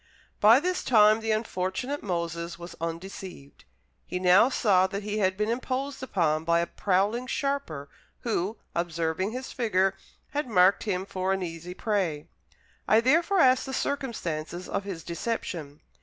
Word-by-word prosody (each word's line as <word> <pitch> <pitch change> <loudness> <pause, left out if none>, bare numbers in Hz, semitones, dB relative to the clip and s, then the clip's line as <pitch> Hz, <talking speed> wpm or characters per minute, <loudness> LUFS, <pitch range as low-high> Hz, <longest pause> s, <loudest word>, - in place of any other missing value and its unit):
By 225 +5 +7
this 360 +4 -1
time 215 -2 +5
the 225 0 -4
unfortunate 215 +5 -2
Moses 170 -2 -3
was 170 0 -9
undeceived. 165 - -7 0.4
He 180 - -4
now 185 +6 +5
saw 190 -7 +3
that 200 +2 -5
he 210 +1 -2
had 190 -2 +1
been 210 +2 0
imposed 260 +3 -3
upon 160 -11 0
by 170 +1 +3
a 170 - +1
prowling 205 +8 0
sharper, 275 - -2 0.3
who, 215 -2 -1 0.2
observing 170 +2 -1
his 255 +2 -6
figure, 195 -5 +1 0.4
had 295 -1 -2
marked 190 -2 +4
him 190 -3 -1
for 190 0 -1
an 190 -1 -2
easy 170 +1 -6
prey. 185 -10 -1 0.6
I 220 - +6
therefore 335 +10 +3
asked 255 +1 +4
the 265 - -3
circumstances 180 - -3
of 200 - -3
his 180 -5 -6
deception. 170 -6 -4
195 Hz, 150 wpm, -27 LUFS, 170-235 Hz, 0.6 s, By